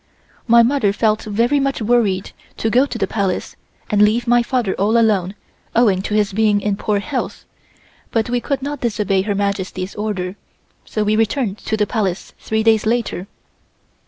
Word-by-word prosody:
My 235 0 +7
mother 240 -4 +2
felt 215 0 +1
very 230 +7 +1
much 275 0 -1
worried 215 -4 +1 0.3
to 225 - -1
go 255 +4 +4
to 245 - -5
the 200 - +1
Palace 195 -2 -2 0.4
and 210 -1 +3
leave 215 +3 +3
my 240 0 +4
father 240 -5 -1
all 210 +4 +1
alone 205 -4 +2 0.4
owing 210 -6 +3
to 210 +2 -3
his 210 -2 +1
being 210 0 +3
in 205 0 -1
poor 210 +1 -1
health, 255 +6 -4 0.6
but 225 -1 0
we 245 0 0
could 275 0 -2
not 290 -1 -4
disobey 210 -5 0
Her 205 +1 -2
Majesty's 195 -1 -2
order, 205 -3 -3 0.5
so 215 - -2
we 210 +1 +1
returned 220 -1 0
to 220 - -2
the 210 - +2
Palace 200 -5 -2
three 220 0 -1
days 220 -1 +3
later. 230 -5 -1
215 Hz, 175 wpm, -19 LUFS, 200-235 Hz, 0.6 s, My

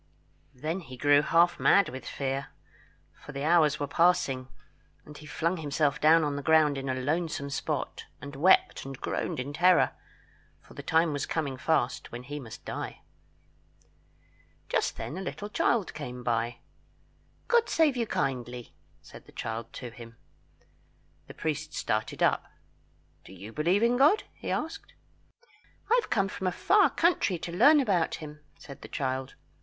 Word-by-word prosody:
Then 155 +8 -3
he 130 -7 -11
grew 145 +2 +5
half 170 +3 +3
mad 200 -2 +4
with 130 +1 -8
fear, 135 0 -3 0.7
for 145 - -12
the 140 0 -4
hours 155 -2 +4
were 145 - -1
passing, 140 -5 +2 0.6
and 150 - -12
he 150 - -11
flung 170 +4 -1
himself 145 -2 0
down 160 +2 +6
on 145 -1 -1
the 145 - -3
ground 155 -1 +4
in 135 0 -4
a 130 - 0
lonesome 145 +1 -2
spot, 135 - -3
and 140 -1 -9
wept 175 +7 +4
and 135 -1 -8
groaned - - -3
in 140 +3 -4
terror, 180 +3 +4 0.7
for - - -18
the - - -8
time 160 -1 +2
was 145 -1 -3
coming 145 -5 -2
fast 130 -1 -1
when 120 +1 -7
he 145 +3 -6
must 115 -5 -11
die. - - -6 1.7
Just - - 0
then 165 - -5
a - - -5
little 205 +2 -5
child 210 -1 +1
came 125 -4 -7
by. 115 0 -1 0.9
"God 475 -1 +3
save 310 -5 +3
you 235 -2 -1
kindly," 125 - -3 0.3
said - - -14
the - - -15
child 115 0 -5
to 125 -2 -7
him. 115 -1 -12 1.1
The - - -11
priest 155 -3 -3
started 110 -1 -1
up. - - +2 0.8
"Do 95 - -13
you 100 +4 -10
believe 175 +8 +2
in 240 +1 +3
God?" 300 +11 +5
he - - -7
asked. 315 +2 -4 1.0
"I 485 - +6
have 430 - -11
come 195 -2 +2
from 190 0 -4
a - - +1
far 400 - +4
country 335 - +1
to 170 +1 -6
learn 290 - +7
about 195 -11 +1
him," 150 -1 -9 0.2
said 140 -2 -12
the - - -9
child. 130 -2 -3
150 Hz, 165 wpm, -28 LUFS, 130-180 Hz, 1.7 s, learn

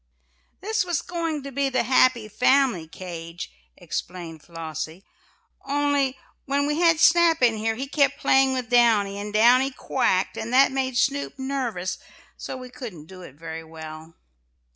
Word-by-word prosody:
"This 435 +1 0
was 350 -4 -2
going 330 -4 -3
to 275 - -7
be 275 +1 0
the 255 -2 +1
happy 255 -2 +3
family 245 -5 +2
cage," 170 -1 -8 0.3
explained 170 -3 -6
Flossie, 165 +2 -7 0.6
"only 280 -1 0 0.3
when 280 +1 0
we 295 +2 -1
had 335 -2 +4
Snap 335 -3 +5
in 235 -2 +4
here 225 +1 -1
he 260 +4 -4
kept 280 0 +1
playing 265 -1 +3
with 250 -2 -4
Downy, 215 -5 +3
and 205 +1 -5
Downy 245 +5 +5
quacked 250 -7 0
and 230 - -4
that 265 +1 +5
made 260 -2 -1
Snoop 280 +3 0
nervous 255 -9 -3 0.4
so - - -7
we 255 -1 -10
couldn't 195 - -9
do 185 +2 -12
it 140 -7 -12
very 160 +1 -7
well." 160 0 -10
250 Hz, 155 wpm, -24 LUFS, 185-275 Hz, 0.6 s, Snap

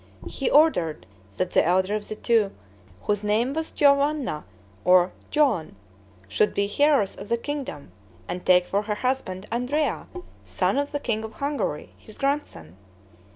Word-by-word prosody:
He 270 - -2
ordered 175 - +3 0.3
that 185 - -1
the - - +4
elder 185 +3 +2
of 210 -1 -3
the 215 - -5
two, 220 -2 +2 0.5
whose 205 0 -1
name 220 +6 +1
was 320 +1 -3
Giovanna 280 - +2 0.4
or 180 0 +5 0.2
Joan, 280 - +1 0.5
should 100 - +1
be 200 0 +1
heiress 285 -9 +3
of - - -9
the 235 - +2
kingdom, 240 - -6 0.4
and 180 - -5
take 180 -1 +5
for 200 +3 0
her 210 0 -3
husband 210 -6 -2
Andrea, 260 +6 -1 0.4
son 275 - 0
of 285 0 -2
the 290 - -2
king 225 -5 -2
of 220 - -7
Hungary, 280 - -3
his 215 - -15
grandson. 275 - -3
220 Hz, 155 wpm, -25 LUFS, 185-280 Hz, 0.5 s, or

